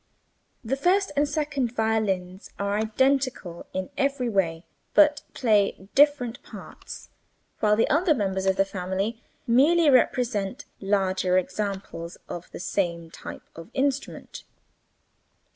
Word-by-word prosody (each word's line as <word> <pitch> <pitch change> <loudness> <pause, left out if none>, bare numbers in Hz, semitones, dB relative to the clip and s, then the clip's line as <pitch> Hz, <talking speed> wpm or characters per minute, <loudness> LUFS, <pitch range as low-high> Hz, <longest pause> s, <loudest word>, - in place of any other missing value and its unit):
The 245 +4 -1
first 370 +7 +2
and 290 0 +2
second 285 -6 -2
violins 200 -5 -1
are 200 0 -1
identical 225 -4 0
in 185 0 -4
every 275 -3 0
way 170 -5 0 0.3
(but 295 -1 +5
play 205 -5 +1
different 275 -5 +3
parts), - - -11 0.5
while 210 -1 +3
the 225 - +2
other 315 +1 +3
members 190 -4 -1
of 190 - +3
the 195 0 +2
family 195 +4 -3 0.2
merely 295 +6 +4
represent 240 -6 +1
larger 190 -2 +1
examples 185 -3 -3
of 175 - -7
the - - -9
same 170 -3 -2
type - - -9
of 165 +4 -10
instrument. 275 0 -2
215 Hz, 120 wpm, -25 LUFS, 190-270 Hz, 0.5 s, but